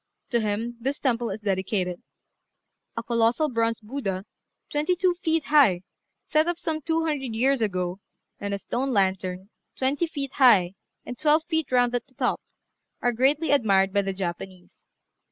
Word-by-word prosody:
To 235 - +3
him 220 +3 -2
this 270 +4 -1
temple 240 -3 0
is 205 +2 -5
dedicated. 190 -2 -1 1.0
A 230 - -2
colossal 235 +6 +2
bronze 230 -2 0
Buddha, 210 -5 -4 0.5
twenty 300 +5 +1
two 360 0 +2
feet 325 -3 +1
high, 255 -13 +4 0.4
set 310 +1 +2
up 345 -1 0
some 320 -2 -3
two 325 +2 0
hundred 270 -7 -2
years 260 +2 +2
ago, 185 -3 -1 0.4
and 200 - -4
a 200 - -1
stone 255 +6 -2
lantern, 190 -1 -1 0.3
twenty 280 +6 0
feet 280 -4 -5
high, 200 -9 +5 0.3
and 245 - -7
twelve 305 +1 +3
feet 320 -5 -1
round 245 -1 +3
at 245 +1 -2
the 260 - -27
top, - - 0 0.6
are 245 - +2
greatly 280 +5 +2
admired 195 -8 +3
by 200 - +3
the 195 0 -2
Japanese. 185 0 -7
240 Hz, 160 wpm, -25 LUFS, 195-285 Hz, 1.0 s, high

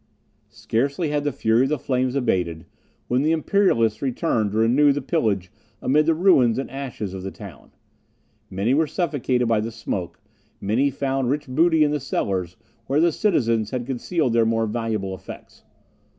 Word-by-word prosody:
Scarcely 140 +7 -1
had 145 0 -1
the 145 - 0
fury 115 -1 +2
of 135 - +2
the 150 - 0
flames 130 0 -1
abated, 90 -10 -1 0.4
when 125 +2 +1
the 155 +3 +2
Imperialists 155 - +2
returned 125 -5 0
to 105 - -3
renew 125 +6 +4
the 140 - -1
pillage 110 - -1 0.3
amid 150 +4 +2
the 165 - +3
ruins 150 - +4
and 135 - -4
ashes 130 -8 -5
of 95 - -6
the 95 - -5
town. 95 - -12 0.8
Many 100 +7 0
were 155 +2 +2
suffocated 140 -8 -1
by 115 -2 +2
the 110 +2 -3
smoke; 105 -5 -5 0.4
many 115 +8 +1
found 135 -1 -1
rich 145 +2 -1
booty 160 +4 +3
in 145 - +2
the 150 - -1
cellars, 95 -9 -2 0.3
where 140 +2 +1
the 170 +1 +4
citizens 115 - +1
had 125 -1 -3
concealed 135 +1 -1
their 115 -1 +4
more 115 0 +1
valuable 110 -3 -2
effects. 95 - -11
125 Hz, 170 wpm, -23 LUFS, 110-145 Hz, 0.8 s, renew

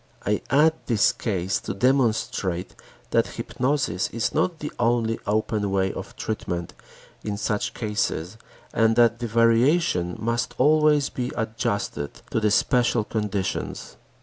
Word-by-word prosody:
I 105 +1 +1
add 150 +3 +5
this 110 -5 +4
case 95 -3 -2
to - - -5
demonstrate 110 -7 0 0.4
that - - +3
hypnosis 125 -9 -1
is 115 -2 -2
not 170 +2 +1
the 150 -1 -5
only 115 -1 +1
open 105 -1 0
way 95 -1 +1
of - - -8
treatment 85 -6 -4 0.5
in 105 -1 -3
such 105 0 -2
cases 105 -4 -2 0.4
and 115 0 +3
that 120 0 +4
the 120 - -3
variations 115 - +2
must 115 +2 -1
always 150 0 +4
be 125 0 -3
adjusted 110 -9 -3
to - - +1
the 110 -1 +2
special 120 +1 +2
conditions. 105 -3 -3
115 Hz, 130 wpm, -24 LUFS, 100-125 Hz, 0.5 s, add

